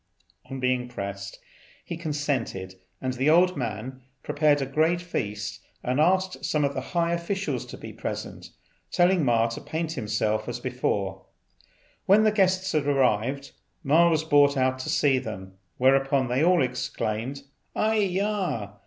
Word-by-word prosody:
On 135 - -5
being 125 -1 0
pressed 100 -4 -6 0.5
he 170 - -5
consented, 145 - -3 0.3
and 130 -1 -2
the 130 +4 +1
old 180 +3 +5
man 125 +1 -5 0.2
prepared 145 -1 +2
a 135 - -1
great 160 +6 +1
feast, 105 -11 -4 0.2
and 125 +3 0
asked 185 +3 +2
some 150 -2 +1
of 140 - -1
the 130 - -3
high 170 +4 0
officials 190 +4 -2
to - - -9
be - - -9
present, - - -6 0.4
telling 180 -1 +3
Ma 115 -3 +3
to 115 - -6
paint 160 0 -3
himself 110 -3 -1
as 120 - -4
before. 100 -7 -2 0.8
When 205 +3 +6
the 215 - +4
guests 190 -2 +2
had 150 -2 0
arrived, 135 0 +1 0.3
Ma 165 +4 +5
was 160 -2 +1
brought 145 -2 +4
out 130 0 +1
to 130 - -5
see 135 -3 +3
them; 95 -6 -7 0.2
whereupon 135 0 +3
they 130 +5 +1
all 175 -3 +4
exclaimed, 125 +1 -3 0.3
"Ai 220 +1 +2
yah! 190 - -1
140 Hz, 155 wpm, -26 LUFS, 120-170 Hz, 0.8 s, When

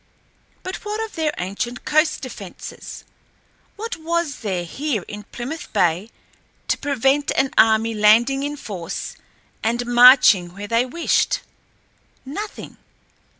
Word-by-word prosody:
But 370 - -4
what 420 +1 -5
of 440 - -13
their 315 -2 0
ancient 200 +7 -4
coast 310 +1 +2
defenses? 205 -8 -9 0.7
What 455 0 -5
was 335 -2 -2
there 190 -5 -2
here 250 - -3
in 210 - -7
Plymouth 310 +12 -7
Bay 175 +5 +1 0.6
to - - +2
prevent 280 +1 +1
an 270 0 +2
enemy 225 +1 +4
landing 225 +6 +4
in 290 +1 -3
force 185 - -6 0.5
and 235 +2 0
marching 240 -7 +6
where 200 +1 -6
they 230 +3 +1
wished? 335 +7 +1 0.8
Nothing. 405 +11 -7
250 Hz, 120 wpm, -21 LUFS, 210-300 Hz, 0.8 s, marching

